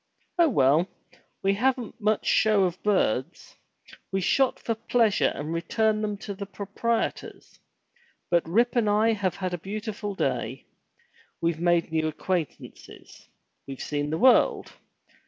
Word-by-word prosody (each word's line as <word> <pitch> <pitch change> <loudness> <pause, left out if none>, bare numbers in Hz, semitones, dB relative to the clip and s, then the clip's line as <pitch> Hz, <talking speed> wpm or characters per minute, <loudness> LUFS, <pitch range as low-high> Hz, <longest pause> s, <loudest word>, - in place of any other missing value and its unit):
Oh 335 -2 +6
well! 155 - +3 0.5
we 195 0 +3
haven't 245 +1 -1
much 215 0 +1
show 215 -3 +3
of 180 -1 -2
birds. 185 - -1 0.6
We 195 - 0
shot 260 +8 +2
for 230 - -2
pleasure 225 -1 +2
and 150 +3 -4
returned 215 +6 0
them 210 -1 -2
to 205 - -4
the 200 0 -7
proprietors. 205 +4 -3 0.7
But 170 -2 +2
Rip 235 +8 +2
and 230 -3 +2
I 215 +2 +3
have 195 -4 -1
had 185 -2 -3
a 175 - -3
beautiful 205 +1 -5
day. - - -2 0.7
We've 165 -1 -1
made 175 -1 +2
new 160 -1 0
acquaintances. 160 0 -5 0.4
We've 135 -1 -7
seen 145 0 -2
the 160 - -1
world. 255 +5 +4
200 Hz, 140 wpm, -26 LUFS, 170-220 Hz, 0.7 s, Oh